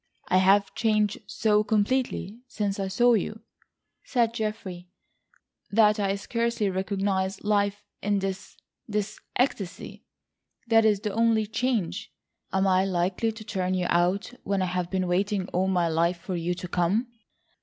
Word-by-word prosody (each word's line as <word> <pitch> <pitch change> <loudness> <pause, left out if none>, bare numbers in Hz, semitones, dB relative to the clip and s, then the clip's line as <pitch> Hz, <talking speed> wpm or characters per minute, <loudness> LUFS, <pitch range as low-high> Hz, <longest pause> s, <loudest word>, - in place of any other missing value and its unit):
"I 185 - +4
have 195 +2 +4
changed 215 -2 +1
so 210 -1 +2
completely 220 0 0
since 205 -4 -2
I 195 - -1
saw 240 +6 +4
you," 215 +1 -1 0.6
said 235 -3 +1
Geoffrey, 210 -5 -4 0.8
"that 210 0 +4
I 195 -1 +1
scarcely 230 0 -1
recognise 195 0 -1
life 205 -1 +1 0.2
in 205 0 +1
this—this 200 +2 -5 0.2
ecstasy. 215 -8 -2 0.6
That 225 -1 +4
is 210 -2 +3
the 210 -2 -3
only 225 -1 +3
change. 225 -3 -2 0.4
Am 190 0 +2
I 190 -1 +4
likely 185 +4 0
to 220 0 -10
turn 185 -3 -1
you 180 -1 0
out 180 +7 +1
when 195 -1 0
I 180 -1 -2
have 180 -1 -1
been 185 -1 0
waiting 190 +1 0
all 185 +2 0
my 180 -3 +2
life 170 +2 +1
for 180 +2 -5
you 175 +1 -1
to 180 - -6
come?" 180 +7 +1
200 Hz, 145 wpm, -26 LUFS, 185-215 Hz, 0.8 s, I